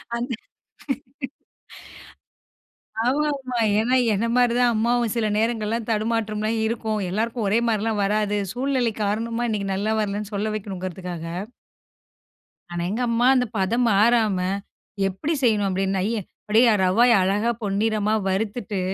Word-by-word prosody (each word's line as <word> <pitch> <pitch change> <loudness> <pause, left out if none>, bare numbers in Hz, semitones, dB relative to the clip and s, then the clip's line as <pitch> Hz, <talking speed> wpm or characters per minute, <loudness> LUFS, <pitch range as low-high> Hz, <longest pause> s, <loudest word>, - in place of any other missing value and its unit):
அந்த 245 +2 -3 2.7
ஆமாமா. 270 -2 0 0.2
ஏன்னா 245 +4 +2 0.2
என்ன 210 +4 0
மாதிரி 245 -1 +4
தான் 240 -1 +4
அம்மாவும். 235 0 +1
சில 220 -2 +1
நேரங்கள்லாம் 225 0 -1
தடுமாற்றம்லாம் 215 0 -1
இருக்கும், 220 -1 -1
எல்லாருக்கும் 225 +2 -1
ஒரே 225 +3 +3
மாதிரிலாம் 215 -1 0
வராது. 210 0 +1 0.2
சூழ்நிலை 250 -3 0
காரணமா 230 +3 -1
இன்னைக்கு 200 -2 -2
நல்லா 215 +3 0
வரலைன்னு 205 0 -2
சொல்ல 210 +2 -1
வைக்கணுங்குறதுக்காக 185 -4 -5 1.5
ஆனா 175 0 -2
எங்க 235 +4 -1
அம்மா 235 +2 +2
அந்த 250 -1 +2
பதம் 235 +6 +1
மாறாம 215 -1 +3 0.7
எப்படி 195 - -3
செய்யணும் 210 -4 +3
அப்டீன்னா, 190 0 0 0.4
அப்படியே 225 +2 +5
ரவய 230 +7 +4
அழகா 205 +5 +1
பொன்னிறமா 210 +1 +1
வறுத்துட்டு, 205 +1 -2
220 Hz, 115 wpm, -23 LUFS, 205-235 Hz, 2.7 s, அப்படியே